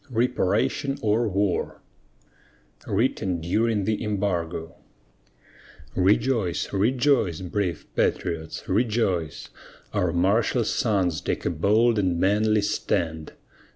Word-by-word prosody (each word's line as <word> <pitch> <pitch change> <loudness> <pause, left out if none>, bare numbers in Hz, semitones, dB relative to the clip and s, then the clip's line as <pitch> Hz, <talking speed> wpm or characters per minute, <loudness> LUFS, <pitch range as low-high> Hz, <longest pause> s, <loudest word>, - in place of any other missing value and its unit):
REPARATION 125 +3 0
OR 110 +2 +2
WAR 100 -1 -1 1.1
WRITTEN 100 -4 0
DURING 105 +5 0
THE 110 +1 -1
EMBARGO 90 -6 -2 1.2
Rejoice, 100 0 +1
rejoice, 115 - +2
brave 90 -2 -2
patriots, 80 +5 -2
rejoice! 100 - 0 0.4
Our 90 -2 +1
martial 100 +7 +2
sons 95 - 0
take - - -3
a - - +1
bold 105 +7 +3
and 90 -4 0
manly 105 +3 +2
stand! 80 -5 -2
100 Hz, 90 wpm, -25 LUFS, 90-110 Hz, 1.2 s, bold